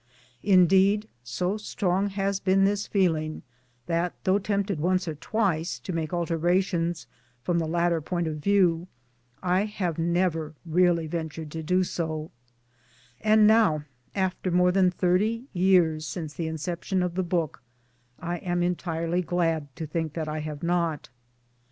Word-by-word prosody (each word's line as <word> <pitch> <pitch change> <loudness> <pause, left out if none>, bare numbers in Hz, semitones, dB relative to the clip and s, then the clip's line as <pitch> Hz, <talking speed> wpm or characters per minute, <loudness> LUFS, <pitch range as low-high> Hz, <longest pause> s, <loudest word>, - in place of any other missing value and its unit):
Indeed, 195 +2 +4 0.2
so 180 - -2
strong 200 -2 -1
has 195 0 -1
been 195 0 +3
this 200 +1 0
feeling 160 -6 0 0.4
that, 170 +3 -1
though 190 +2 +3
tempted 200 -3 -1
once 180 +3 +1
or 160 - -2
twice 170 0 -1
to 185 - -6
make 160 -2 -2
alterations 175 0 0 0.4
from 170 +5 +1
the 165 - -1
latter 170 0 +1
point 175 +2 -2
of 155 -1 -3
view, 180 -1 +2 0.6
I 185 +2 +2
have 185 -6 -3
never 165 -2 0
really 170 0 +3
ventured 160 -1 -5
to 160 - -5
do 180 +4 +2
so; 160 -3 -3 0.9
and 215 0 +5
now, 210 -9 +4 0.3
after 190 -1 -1
more 180 +1 +4
than 185 0 +4
thirty 190 +6 +1
years 175 -5 +3
since 155 +2 -5
the 165 0 -3
inception 175 +4 -2
of 180 -1 -2
the 185 - 0
book, 170 -6 -2 0.6
I 175 +1 -3
am 175 -1 -1
entirely 175 -1 -1
glad 165 -3 0
to 160 - -5
think 160 0 -3
that 160 -1 -3
I 155 0 -3
have 150 0 -6
not. 170 -4 0
175 Hz, 145 wpm, -26 LUFS, 160-190 Hz, 0.9 s, and